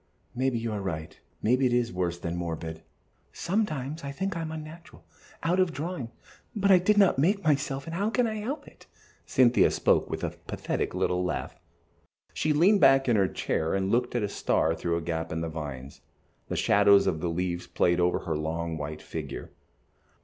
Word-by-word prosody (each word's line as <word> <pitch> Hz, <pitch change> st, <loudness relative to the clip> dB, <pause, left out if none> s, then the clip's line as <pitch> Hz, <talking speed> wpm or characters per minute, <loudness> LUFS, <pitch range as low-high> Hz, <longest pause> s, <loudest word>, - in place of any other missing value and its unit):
"Maybe 130 Hz, 0 st, 0 dB
you 115 Hz, 0 st, -3 dB
are 105 Hz, -1 st, -3 dB
right, 80 Hz, -5 st, -5 dB, 0.2 s
maybe 125 Hz, +4 st, +3 dB
it 120 Hz, -, 0 dB
is 120 Hz, -1 st, +1 dB
worse 90 Hz, -1 st, -1 dB
than 85 Hz, 0 st, -4 dB
morbid. 80 Hz, -2 st, -4 dB, 0.5 s
Sometimes 165 Hz, -6 st, -2 dB
I 140 Hz, -, -4 dB
think 190 Hz, +5 st, -3 dB
I 165 Hz, -, -3 dB
am 160 Hz, -1 st, -4 dB
unnatural, 160 Hz, +1 st, -10 dB, 0.4 s
out 175 Hz, +3 st, +2 dB
of 185 Hz, -2 st, +3 dB
drawing, 150 Hz, -3 st, -4 dB, 0.5 s
but 200 Hz, -1 st, +3 dB
I 185 Hz, -, +8 dB
did 205 Hz, +4 st, +2 dB
not 195 Hz, -9 st, +5 dB
make 195 Hz, +7 st, +2 dB
myself, 140 Hz, -3 st, 0 dB
and 165 Hz, -, -6 dB
how 200 Hz, +4 st, 0 dB
can 245 Hz, +1 st, +2 dB
I 220 Hz, -1 st, -2 dB
help 250 Hz, +9 st, -4 dB
it?" -, -, -17 dB, 0.4 s
Cynthia 125 Hz, -2 st, +4 dB
spoke -, -, +2 dB
with -, -, -4 dB
a -, -, -1 dB
pathetic -, -, -4 dB
little 90 Hz, 0 st, 0 dB
laugh. 90 Hz, -, -3 dB, 0.8 s
She 155 Hz, -, 0 dB
leaned 185 Hz, +7 st, +4 dB
her 135 Hz, -, +9 dB
head 135 Hz, 0 st, +5 dB
back 135 Hz, -, -3 dB
in 120 Hz, -, +4 dB
her 100 Hz, -2 st, +3 dB
chair, 80 Hz, -1 st, -1 dB
and 95 Hz, 0 st, 0 dB
looked 125 Hz, +1 st, +1 dB
at 120 Hz, -, +1 dB
a -, -, +1 dB
star 80 Hz, -4 st, +1 dB
through 85 Hz, +1 st, -1 dB
a -, -, -3 dB
gap 80 Hz, 0 st, -3 dB
in 80 Hz, 0 st, -2 dB
the 80 Hz, -, -3 dB
vines. 70 Hz, -4 st, -7 dB, 0.5 s
The -, -, -3 dB
shadows 100 Hz, 0 st, +5 dB
of 80 Hz, -, 0 dB
the 85 Hz, -, -1 dB
leaves 85 Hz, +1 st, -2 dB
played 85 Hz, 0 st, +2 dB
over 90 Hz, 0 st, +2 dB
her 80 Hz, -3 st, -2 dB
long, 80 Hz, +2 st, -3 dB
white 75 Hz, +1 st, -6 dB
figure. -, -, -6 dB
120 Hz, 200 wpm, -28 LUFS, -, 0.8 s, her